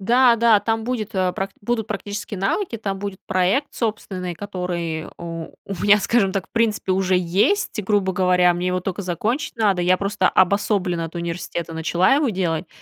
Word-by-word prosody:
Да, 240 +4 +4
да, 225 -3 +5
там 225 -1 -1
будет 230 -3 -3
э, 185 -1 +1 0.3
будут 220 0 -2
практические 205 0 -5
навыки, 230 - -1
там 195 -3 -4
будет 200 -2 -5
проект 190 +11 +1
собственный, 190 -6 -3
который 175 -5 -4
у 165 -1 -6 0.2
у 195 - -5
меня, 205 0 +6
скажем 205 -1 +2
так, 190 -1 -3
в - - -60
принципе 220 -4 +1
уже 185 0 +2
есть. 205 - +1
Грубо 190 -1 +1
говоря, 180 -1 +3
мне 175 +1 -1
его 180 0 0
тока 190 +2 -4
закончить 225 - -2
надо. 200 -5 +2
Я 185 +1 +4
просто 200 -1 +1
обособленно 185 -3 +1
от 165 - -10
университета 170 0 -4
начала 170 +8 +2
его 290 -1 +2
делать. 180 -5 -1
195 Hz, 175 wpm, -22 LUFS, 180-215 Hz, 0.3 s, меня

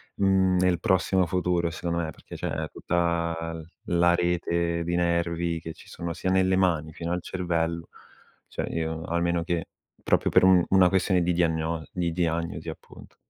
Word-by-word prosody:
mhmm, 95 -2 +3
nel 90 -2 +2
prossimo 95 0 +2
futuro, 90 0 0
secondo 85 +1 -3
me, 80 -2 -2
perché - - -12
c'è 80 +1 -3
tutta 85 -1 -1
l 80 -1 -8 0.2
la 85 0 +4
rete 85 -1 0
di 85 +1 -1
nervi 85 -1 0
che 80 0 -7
ci - - -17
sono, 85 -1 -5
sia 95 +2 -3
nelle 95 0 +3
mani, 80 -5 +1
fino 85 +2 -5
al 90 0 -1
cervello. 85 -2 -2 0.6
Cioè, - - -4
io, 80 0 -3
almeno, 85 0 0
che, 85 -1 -2 0.4
proprio - - +1
per - - +5
un 95 -2 +6
una 95 -1 +6
questione 95 -1 +2
di 90 0 +1
diagno 80 -1 0
di 85 -2 -1
diagnosi, 85 -1 -2
appunto. - - -12
85 Hz, 165 wpm, -26 LUFS, 85-90 Hz, 0.6 s, un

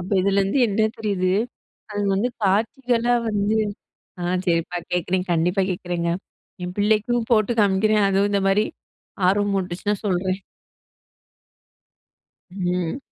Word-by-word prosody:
அப்ப 180 +3 -7
இதுலேருந்து 195 +5 +2
என்ன 215 +2 +2
தெரியுது? 190 -4 0 0.6
அது 205 - -2
வந்து 205 +6 +1 0.2
காட்சிகளா 235 +4 +1 0.2
வந்து 210 +1 +1 0.7
ஆ - - -3 0.2
சரிப்பா. 170 0 0
கேட்குறேன். 180 +1 0
கண்டிப்பா 175 +4 +2
கேட்குறேங்க. 175 -2 -2 0.5
என் 180 0 -4
பிள்ளைக்கும் 220 +3 +1
போட்டு 215 0 +3
காமிக்கிறேன், 205 +1 +3
அதுவும் 195 +1 +2
இந்த 200 - +2
மாரி 200 +2 +3 0.6
ஆர்வமூட்டுச்சுன்னா, 195 0 0
சொல்றேன். 185 0 0 2.1
ம். 180 +3 -2
195 Hz, 105 wpm, -23 LUFS, 180-210 Hz, 2.1 s, போட்டு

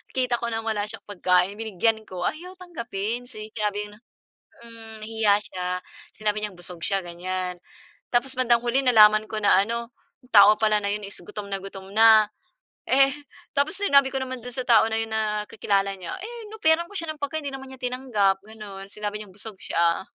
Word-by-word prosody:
kita 250 -2 +1
ko 235 - -3
nang 225 -1 -3
wala 210 -1 -1
siyang - - -10
pagkain, 185 +1 +1
binigyan 220 +1 0
ko. 180 -1 -5
Ayaw 360 - -3
tanggapin 240 - -4
si 215 -3 -9
sinabi 210 -1 -2
na, 210 - -16 0.6
hmm, 225 -2 -11
nahiya 220 -2 +2
siya. 180 -1 -6 0.5
Sinabi 215 0 -1
niyang 205 -3 -4
busog 175 -1 -8
siya, 195 -2 0
ganyan. 180 +1 -4 0.5
Tapos 250 +2 +1
bandang 240 -2 +3
huli 245 +3 +2
nalaman 215 -3 +6
ko 215 - -3
na 190 - +6
ano, 235 +2 -4 0.3
yung 250 - -23
tao 210 0 +9
pala 215 -1 +3
na 200 - 0
yun 210 0 -3
is 200 - -8
gutom 205 +3 -7
na 195 - -1
gutom 195 0 -10
na. 220 -1 +7 0.6
Eh 270 +1 +5 0.4
tapos 300 +8 +1
sinabi 280 -8 +4
ko 270 - -1
naman 260 -1 -4
dun 250 - -7
sa 255 - -3
tao 230 -3 +7
na 220 - +1
yun 225 - -2
na 210 -1 -1
kakilala 195 -1 0
niya 185 - -6
eh, 460 +4 -8
"In-offeran 340 -5 +2
ko 410 - -15
siya 330 -4 -3
ng - - -24
pagkain, 285 +2 -2
hindi 280 - -5
naman 265 0 -10
niya 260 - -11
tinanggap, 235 -7 0
gano'n. 205 -3 -10
Sinabi 210 0 -4
niyang 195 - -15
busog 210 +1 -9
siya." 170 +1 +1
220 Hz, 195 wpm, -25 LUFS, 200-250 Hz, 0.6 s, tao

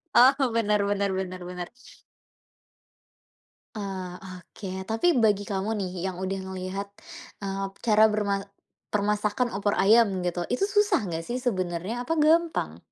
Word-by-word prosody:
Oh, 265 -1 +6
benar 210 -2 +2
benar 200 -1 +1
benar 185 -1 -5
benar. 180 -1 -5 2.1
Oh, 190 -3 -5
oke. 190 +1 -8
Tapi 250 - +2
bagi 210 -3 +3
kamu 195 +1 -1
nih, 185 - -3
yang 190 -2 -2
udah 190 +1 -2
ngelihat, 190 +1 -5 0.5
eee, 195 0 -2 0.2
cara 215 -2 +5
berma 205 -2 0 0.5
permasakan 210 +3 +1
opor 205 0 +1
ayam 200 -2 +4
gitu. 175 -1 -2
Itu 395 +11 +1
susah 410 - +3
enggak 165 0 -4
sih 250 +5 -3
sebenarnya? 190 +1 -2
Apa 325 - 0
gampang? 330 +2 +2
200 Hz, 130 wpm, -26 LUFS, 190-230 Hz, 2.1 s, Oh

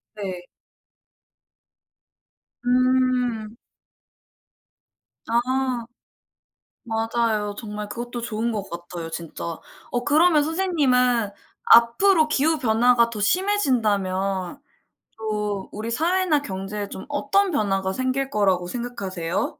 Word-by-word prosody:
네. 185 -4 -6 2.2
음. 250 -3 +1 1.7
아. 250 +1 0 1.0
맞아요. 225 -2 -1
정말 210 -2 -6
그것도 240 +2 -5
좋은 230 0 -2
것 205 -3 -4
같아요 170 -1 -7
진짜. 165 -1 -7 0.5
어. 245 0 -1
그러면 310 +1 +4
선생님은 260 - +2 0.3
앞으로 310 +9 +5
기후 310 +1 +2
변화가 235 0 +3
더 215 -3 -5
심해진다면 205 - +1 0.6
또 210 -3 -3
우리 225 +2 -4
사회나 330 +1 +1
경제에 200 -1 -5
좀 190 - -8
어떤 320 +7 +1
변화가 195 -7 0
생길 260 +4 -1
거라고 190 -5 +1
생각하세요? 190 -6 -3
235 Hz, 200 characters per minute, -23 LUFS, 205-265 Hz, 2.2 s, 앞으로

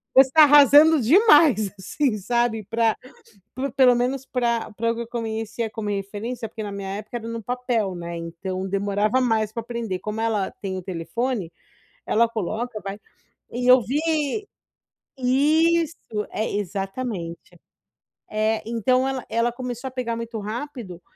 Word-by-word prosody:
você 265 0 +7
tá 315 -1 +8
arrasando 295 +1 +7
demais!" 295 - +5
assim, 240 +4 -1
sabe, 235 +1 0
pra, 225 -1 +2 0.8
pelo 255 -2 +6
menos 255 +2 -1
pra 235 -3 -1
para 230 +2 0
o - - -3
que 235 - -4
eu 235 - -6
conhecia 225 -1 -3
como 215 -1 -5
referência, 205 +4 -4
porque 220 - -7
na 205 - -5
minha 200 -1 -5
época 215 +3 -6
era 230 -1 -8
no 230 -1 -5
papel, 245 -5 -1
né, 170 0 -6
então 185 +3 -5
demorava 205 +4 +1
mais 220 -4 +1
pra 230 - -3
aprender. 230 -5 -4
Como 215 +1 -4
ela 215 -4 0
tem 190 -2 -3
o 185 - -5
telefone, 190 +3 -3 0.6
ela 235 +1 +3
coloca, 225 +2 -3
vai 195 +1 -6 0.5
e 245 +1 -2
eu 255 0 +8
vi 305 - -1 0.7
Isso! 315 +6 +2 0.4
É, 220 - -2
exatamente. 195 -2 -5 0.7
Eh, 215 +1 0
então 255 +3 +1
ela 265 -2 -3
ela 230 +1 +1
começou 250 0 -5
a - - -17
pegar 245 -2 -3
muito 230 -1 -5
rápido, 220 - -6
230 Hz, 150 wpm, -23 LUFS, 205-255 Hz, 0.8 s, tá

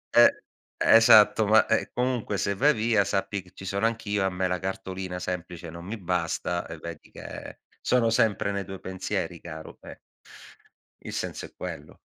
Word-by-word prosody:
Eh, - - +6 0.3
esatto. 110 -1 +6
Ma, 110 +1 +6
ehm, - - +1
comunque 125 -5 -1
se 100 - 0
vai 145 +9 +4
via 110 -2 +2
sappi 100 0 -2
che 90 +1 -20
ci 95 - -10
sono 100 +4 +1
anch'io, 105 -3 -1
a 95 - +2
me 90 0 -1
la 90 0 -1
cartolina 95 -1 -5
semplice 90 -2 -5
non 85 +1 -9
mi 110 +4 -5
basta 90 -1 -2
e 80 - -8
vedi 85 -1 -9
che - - -9 0.2
sono 120 -2 +2
sempre 105 -3 +2
nei 100 0 -2
tuoi 95 0 -8
pensieri 95 -2 -4
caro, 80 -2 -9
eh. - - -11 1.1
Il - - -5
senso - - -4
è - - -14
quello. 75 +1 -8
95 Hz, 175 wpm, -27 LUFS, 90-110 Hz, 1.1 s, Eh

